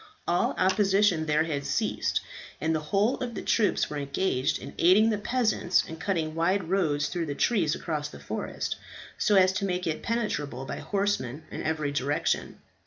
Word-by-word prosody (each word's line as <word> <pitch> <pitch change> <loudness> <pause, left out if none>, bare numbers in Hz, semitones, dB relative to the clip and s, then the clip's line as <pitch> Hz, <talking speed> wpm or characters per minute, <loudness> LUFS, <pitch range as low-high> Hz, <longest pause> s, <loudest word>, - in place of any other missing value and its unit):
All 175 +1 +1
opposition 190 -3 +3
there 155 +1 +3
had 150 -3 -2
ceased, - - 0 0.4
and 160 +1 0
the 155 - +1
whole 210 +6 +2
of 240 -3 -4
the - - -5
troops 215 -3 +2
were 150 - -5
engaged 140 -1 0
in - - -9
aiding 205 +6 +5
the 210 - -1
peasants 215 -5 +1
in 160 - -7
cutting 165 -3 -1
wide 180 +4 +1
roads 155 -6 +1
through 170 -1 -3
the 145 - -3
trees 175 -8 +2
across 150 -2 -3
the - - -11
forest, - - -4 0.4
so 210 - +3
as 185 -1 +5
to 195 +1 -2
make 180 -1 -1
it 155 -1 -2
penetrable 150 - -2
by - - -5
horsemen 195 - -1
in - - -5
every 155 -2 -1
direction. 145 +1 -1
175 Hz, 175 wpm, -27 LUFS, 150-200 Hz, 0.4 s, aiding